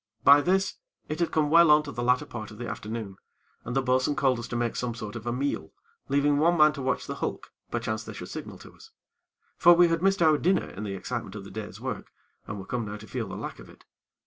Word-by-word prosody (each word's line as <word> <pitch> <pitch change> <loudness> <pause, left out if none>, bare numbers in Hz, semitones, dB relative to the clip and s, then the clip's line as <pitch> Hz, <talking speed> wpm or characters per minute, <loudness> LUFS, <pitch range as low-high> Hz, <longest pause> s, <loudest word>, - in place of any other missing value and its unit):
By 145 +1 +8
this, 190 +4 +1 0.3
it 155 - -3
had 170 - +1
come 150 -2 +1
well 170 0 +7
on 150 0 +6
to 145 - -7
the 120 - -4
latter 125 +4 +2
part 115 -6 -7
of 110 - -12
the 120 +1 -5
afternoon, 105 -3 -5 0.5
and 120 - -5
the 135 - +2
bo'sun 130 +3 +2
called 130 -4 +2
us 120 - -6
to 120 - -5
make 120 -1 -1
some 120 -2 -2
sort 110 -2 -7
of 120 0 -7
a - - +1
meal, 140 +4 -2 0.4
leaving 145 +1 +3
one 170 +3 +3
man 150 -1 +6
to 140 - -6
watch 130 - -1
the - - -4
hulk, - - -4 0.2
perchance - - -2
they - - -8
should - - -8
signal - - -7
to - - -14
us. 450 - -16 0.7
For 175 - +8
we 175 0 +6
had 165 0 0
missed 195 -1 +3
our 155 -2 +5
dinner 185 +3 +2
in 105 +3 -6
the 100 -1 -4
excitement 110 0 -5
of 105 - -7
the 100 - -11
day's 110 -1 -7
work, - - -5 0.4
and 105 - -5
were 95 - -7
come 120 +2 -2
now 105 0 -6
to 105 - -12
feel 115 -2 -4
the 95 - -7
lack - - -6
of - - -13
it. - - -18
130 Hz, 260 wpm, -27 LUFS, 115-155 Hz, 0.7 s, By